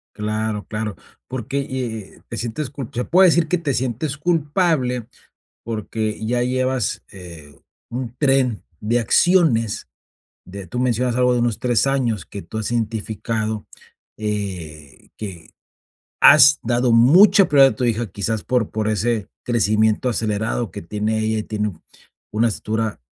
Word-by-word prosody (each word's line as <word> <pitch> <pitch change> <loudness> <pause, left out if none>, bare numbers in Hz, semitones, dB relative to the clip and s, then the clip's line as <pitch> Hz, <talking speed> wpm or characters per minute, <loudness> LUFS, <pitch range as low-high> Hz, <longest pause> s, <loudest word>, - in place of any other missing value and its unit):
Claro, 110 0 -2
claro, 105 -1 -4 0.3
porque, 130 +2 -3
eh 120 -6 -5
eh, - - -22
te 115 - -6
sientes 120 +4 -4
cul 135 -4 -7
se 125 +1 -2
puedo 185 +2 +5
decir 170 -1 +3
que 180 +3 0
te 160 -4 -1
sientes 130 +3 -2
culpable, 150 - 0 0.6
porque 110 -1 -4
ya 120 +2 0
llevas, 130 0 -1
eh, 85 -6 -11 0.4
un 120 0 -5
tren 135 -6 +1 0.2
de 115 +3 +1
acciones 120 - +2 0.6
de 95 0 -9
tú 125 - -4
mencionas 125 -1 0
algo 125 0 +3
de 120 - +1
unos 120 -3 0
3 125 +1 +1
años 120 -9 0
que 100 - -8
tú 110 - -8
has 110 +1 -3
identificado, 110 -1 -2 0.5
eh, 90 -9 -5
que 95 -6 -8 0.7
has 145 -1 +8
dado 120 +1 +1
mucha 185 - +6
prioridad 135 -2 +6
a - - -16
tu 130 - -3
hija, 115 -1 0
quizás 105 +3 -3
por 125 -3 0
por 110 0 -2
ese 110 0 0 0.2
crecimiento 110 0 +1
acelerado 110 -1 -1
que - - -7
tiene 105 +5 -2
ella 110 0 0
y 105 - -3
tiene 105 -2 -3 0.6
una 110 +3 +2
estatura 110 - -3
115 Hz, 150 wpm, -21 LUFS, 105-130 Hz, 0.7 s, has